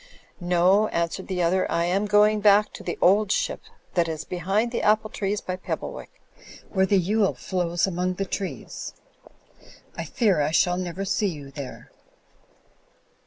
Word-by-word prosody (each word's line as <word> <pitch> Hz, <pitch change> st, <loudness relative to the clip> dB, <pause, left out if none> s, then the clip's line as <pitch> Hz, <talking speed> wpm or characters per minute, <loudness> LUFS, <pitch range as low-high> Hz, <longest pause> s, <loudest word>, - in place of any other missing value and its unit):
"No," 180 Hz, +4 st, +3 dB
answered 170 Hz, +1 st, -2 dB
the 180 Hz, -2 st, -1 dB
other, 185 Hz, +2 st, +1 dB
"I 170 Hz, -, +1 dB
am 195 Hz, +4 st, 0 dB
going 210 Hz, +1 st, +4 dB
back 205 Hz, 0 st, +4 dB
to -, -, -9 dB
The 175 Hz, -, -4 dB
Old 200 Hz, +2 st, +4 dB
Ship' -, -, 0 dB, 0.3 s
that 170 Hz, -2 st, +2 dB
is 160 Hz, -1 st, -4 dB
behind 195 Hz, +8 st, -1 dB
the 240 Hz, -, -2 dB
apple 215 Hz, 0 st, +2 dB
trees 200 Hz, +1 st, -2 dB
by 185 Hz, 0 st, -4 dB
Pebble -, -, -4 dB
wick; -, -, -9 dB, 0.6 s
where 190 Hz, -2 st, +2 dB
the 195 Hz, 0 st, +4 dB
XJle 195 Hz, -, +1 dB
flows 175 Hz, +4 st, -1 dB
among 185 Hz, 0 st, -1 dB
the 195 Hz, -, -2 dB
trees. 195 Hz, 0 st, -5 dB, 1.0 s
I -, -, -4 dB
fear 200 Hz, -10 st, +1 dB
I 145 Hz, -, +1 dB
shall 175 Hz, +3 st, +2 dB
never 185 Hz, +1 st, -4 dB
see 205 Hz, +2 st, +1 dB
you 145 Hz, -6 st, -6 dB
there." 140 Hz, -2 st, -9 dB
185 Hz, 165 wpm, -25 LUFS, 175-205 Hz, 1.0 s, going